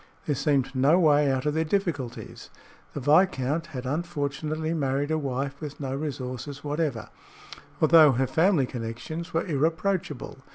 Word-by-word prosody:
There 150 - 0
seemed 140 -2 0
no 140 +6 +4
way 150 -4 +4
out 130 0 -1
of 150 - +1
their 160 +1 +1
difficulties. 145 - -3 0.5
The - - -2
viscount 150 0 +2
had 130 -5 -7
unfortunately 155 +1 -2
married 140 -1 -1
a 155 - +2
wife 135 0 -3
with 150 -2 -7
no 135 -2 -3
resources 140 -1 -5
whatever, 145 -6 -2 0.7
although 155 -2 +7
her 130 +2 +1
family 160 +2 +2
connections 125 +8 -6
were 165 - 0
irreproachable. 160 -2 -1
145 Hz, 140 wpm, -26 LUFS, 135-160 Hz, 0.7 s, although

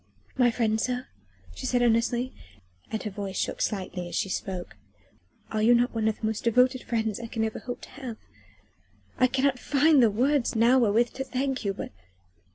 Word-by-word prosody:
"My 250 -2 +4
friends, 225 -2 0
sir?" 250 0 -3 0.5
she 260 - -5
said 245 -1 +2
earnestly, 240 +2 +1 0.6
and 220 - -3
her 210 - -4
voice 195 -1 -5
shook - - -2
slightly 185 -3 -2
as - - -6
she 195 - 0
spoke, 185 -2 -4 0.8
"are 215 - 0
you 235 +3 +6
not 245 +1 +2
one 220 -1 0
of 220 - -1
the - - -3
most 220 -1 -2
devoted 250 +2 +3
friends 220 -3 -2
I 230 - -6
can 225 0 -2
ever 220 - -4
hope 245 0 -6
to - - -11
have? 255 -4 -7 1.0
I 255 - +6
cannot 265 0 +1
find 290 +1 +4
the 230 - +6
words 255 +5 +1
now 235 +4 +5
wherewith 230 +1 +3
to 265 - -4
thank 265 0 -2
you, 200 -2 -1
but...." - - -6
235 Hz, 190 wpm, -27 LUFS, 220-255 Hz, 1.0 s, you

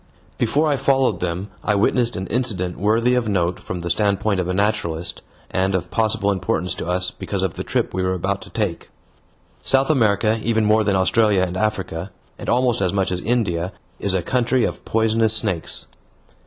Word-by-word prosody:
Before 140 +7 +2
I 145 -2 +2
followed 135 -9 +2
them 90 +3 -3
I 105 - +1
witnessed 120 +4 +2
an 95 - -3
incident 95 -6 -2
worthy 115 +5 +2
of 125 -3 +1
note 90 -3 0
from 90 - -5
the 85 - -4
standpoint 100 +1 +1
of 90 - -1
a 90 - -1
naturalist, 90 -5 -1 0.3
and 95 +1 +1
of 90 -1 -3
possible 110 -2 +1
importance 90 -2 -1
to 90 - -6
us 90 0 -1
because - - -3
of - - -1
the - - -5
trip - - -1
we 95 - -1
were 95 0 0
about 100 +3 -2
to 105 - -11
take. 105 -7 -3 0.7
South 135 - +3
America, 110 -4 +2
even 110 -1 +1
more 110 +1 +4
than 100 -1 +1
Australia 100 +1 +3
and 90 -1 -2
Africa, 95 -3 -2 0.3
and - - -5
almost 120 -2 +2
as 90 -2 +2
much 95 -2 0
as 90 -1 -2
India, 95 -6 0 0.3
is 100 -2 0
a 90 - 0
country 125 +3 +1
of - - -4
poisonous 110 0 +2
snakes. 100 -7 -1
100 Hz, 190 wpm, -21 LUFS, 90-115 Hz, 0.7 s, more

